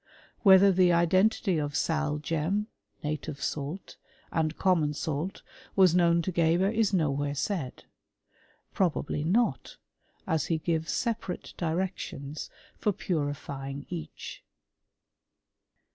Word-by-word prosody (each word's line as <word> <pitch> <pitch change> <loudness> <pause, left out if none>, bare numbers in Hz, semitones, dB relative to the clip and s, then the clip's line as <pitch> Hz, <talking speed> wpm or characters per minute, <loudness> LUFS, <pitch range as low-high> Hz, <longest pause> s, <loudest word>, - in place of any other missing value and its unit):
* - - -31
Whether 195 -1 +7
the 180 -1 +4
identity 185 +2 +3
of 145 -1 -3
sal 155 -2 0
gem 165 +7 -1 0.4
{native 150 -1 -3
salt) 150 +6 -4 0.3
and 160 -1 0
^^mon 165 -6 +2
salt 155 +5 -3 0.3
was 185 -3 +6
known 170 -1 +4
to 185 - -2
Geber 170 +3 +3
is 220 -2 +2
nowhere 145 -5 0
said. 135 -1 -3 0.9
*^robably 155 -5 0
not, 220 +9 0 0.5
as 160 -2 0
he 165 - +1
gives 160 0 -1
separate 225 -6 -3
directions 160 -4 -3 0.3
for 210 - +2
P^irifying 145 -6 -3
each. 160 -4 -7
165 Hz, 110 wpm, -29 LUFS, 150-185 Hz, 0.9 s, Whether